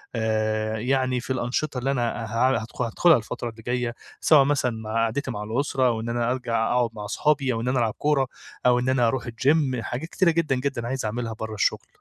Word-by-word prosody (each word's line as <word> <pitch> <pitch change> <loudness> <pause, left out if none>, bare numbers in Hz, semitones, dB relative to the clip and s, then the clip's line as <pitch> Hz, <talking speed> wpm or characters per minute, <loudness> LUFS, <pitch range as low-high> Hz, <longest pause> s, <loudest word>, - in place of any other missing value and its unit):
آآ 110 -1 0
يعني 130 +1 +1
في 130 +2 -3
الأنشطة 130 +3 -2
اللي 135 +2 0
أنا 120 -2 -1
ه 115 +4 +2
هاد 110 - -6 0.2
هادخُلها 140 +7 +4
الفترة 115 +1 -5
اللي 115 0 -12
جاية، 120 0 -2 0.3
سواء 150 -4 +6
مثلًا 140 -3 +1
مع 110 -1 -6
قعدتي 125 +4 -1
مع 105 -3 -4
الأسرة 130 +3 0
أو 115 -2 0
إن 115 - -4
أنا 120 0 0
أرجع 115 -3 0
أقعد 125 -1 +2
مع 105 -1 -7
أصحابي، 140 +3 +1
أو 115 - -2
إن 125 - -3
أنا 125 0 +2
ألعب 110 -3 +1
كورة 145 -3 +2 0.4
أو 125 0 +5
إن 125 - 0
أنا 130 -3 +3
أروح 120 +1 -1
الGym 130 +2 +1
حاجات 135 +9 -5
كتيرة 180 -2 +3
جدًا، 160 -5 +1
جدًا 125 -3 -2
عايز 130 -2 -2
أعملها 115 +1 -3
برا 110 0 -6
الشغل. - - 0
125 Hz, 215 wpm, -25 LUFS, 115-135 Hz, 0.4 s, سواء